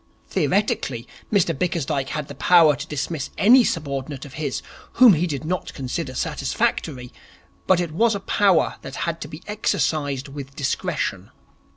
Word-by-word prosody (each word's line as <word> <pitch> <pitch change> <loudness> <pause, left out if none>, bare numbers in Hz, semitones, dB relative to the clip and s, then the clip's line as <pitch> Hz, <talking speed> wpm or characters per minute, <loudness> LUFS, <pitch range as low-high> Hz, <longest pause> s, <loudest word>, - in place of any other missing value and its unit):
Theoretically, - - 0 0.2
Mr 185 -5 +2
Bickersdyke 145 -4 -1
had 150 -2 -3
the - - -8
power 165 -4 +5
to - - -7
dismiss 150 0 -3
any 245 +5 +7
subordinate 140 - -3
of 140 - -12
his 145 -3 -3 0.3
whom 245 -4 +8
he 170 +2 +1
did 150 -1 -4
not 180 +1 -3
consider 135 +1 -4
satisfactory, 125 0 -2 0.5
but 185 -2 +4
it 175 -3 -2
was 220 +7 +2
a - - -2
power 195 -2 +2
that 135 - -8
had 170 -1 -3
to - - -5
be 155 +4 -10
exercised 155 -9 -1
with 140 -1 -9
discretion. 135 -2 -2
155 Hz, 155 wpm, -23 LUFS, 140-180 Hz, 0.5 s, whom